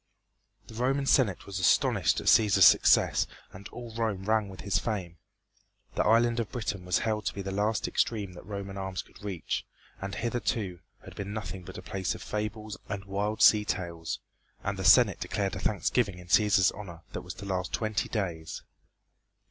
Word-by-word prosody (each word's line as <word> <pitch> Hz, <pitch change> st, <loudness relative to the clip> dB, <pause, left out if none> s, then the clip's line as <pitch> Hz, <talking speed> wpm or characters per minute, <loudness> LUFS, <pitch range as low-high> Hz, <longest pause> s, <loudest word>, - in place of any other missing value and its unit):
The -, -, -13 dB
Roman 135 Hz, +4 st, 0 dB
Senate 120 Hz, -9 st, +2 dB
was 100 Hz, -1 st, -5 dB
astonished 90 Hz, -, +3 dB
at -, -, -8 dB
Cæsar's 100 Hz, -4 st, +6 dB
success -, -, +5 dB, 0.2 s
and 95 Hz, +2 st, -10 dB
all 120 Hz, -2 st, -9 dB
Rome 110 Hz, -4 st, -2 dB
rang 110 Hz, -1 st, +1 dB
with 95 Hz, -, -10 dB
his 100 Hz, -, 0 dB
fame. 90 Hz, -7 st, -4 dB, 0.7 s
The -, -, +1 dB
island 115 Hz, +2 st, +3 dB
of 115 Hz, -, -3 dB
Britain 100 Hz, -6 st, -4 dB
was 90 Hz, -, +2 dB
held 110 Hz, -2 st, -1 dB
to -, -, -1 dB
be 100 Hz, -, -4 dB
the 95 Hz, -, -4 dB
last 105 Hz, +2 st, 0 dB
extreme 105 Hz, -5 st, -1 dB
that 90 Hz, -, -11 dB
Roman 100 Hz, -1 st, -6 dB
arms 95 Hz, -3 st, -4 dB
could 100 Hz, -, -18 dB
reach, 95 Hz, -5 st, -3 dB, 0.4 s
and 95 Hz, +1 st, -4 dB
hitherto 110 Hz, -5 st, -2 dB, 0.3 s
had -, -, -11 dB
been 100 Hz, 0 st, -5 dB
nothing 95 Hz, -4 st, -5 dB
but -, -, -9 dB
a -, -, -8 dB
place 95 Hz, -1 st, -2 dB
of -, -, -9 dB
fables 105 Hz, -1 st, -4 dB
and 100 Hz, -1 st, -4 dB
wild 100 Hz, +2 st, -1 dB
sea 105 Hz, -1 st, +7 dB
tales, 85 Hz, -5 st, -3 dB, 0.5 s
and 100 Hz, -1 st, -3 dB
the -, -, -2 dB
Senate 100 Hz, +3 st, +6 dB
declared 100 Hz, -2 st, -2 dB
a -, -, -4 dB
thanksgiving 105 Hz, -1 st, 0 dB
in 90 Hz, -, -11 dB
Cæsar's 100 Hz, -1 st, +4 dB
honor 90 Hz, -5 st, -9 dB
that -, -, -4 dB
was -, -, -8 dB
to 100 Hz, -, -9 dB
last 95 Hz, -1 st, -2 dB
twenty 110 Hz, -2 st, -1 dB
days. 85 Hz, -7 st, -4 dB
100 Hz, 185 wpm, -29 LUFS, 95-110 Hz, 0.7 s, sea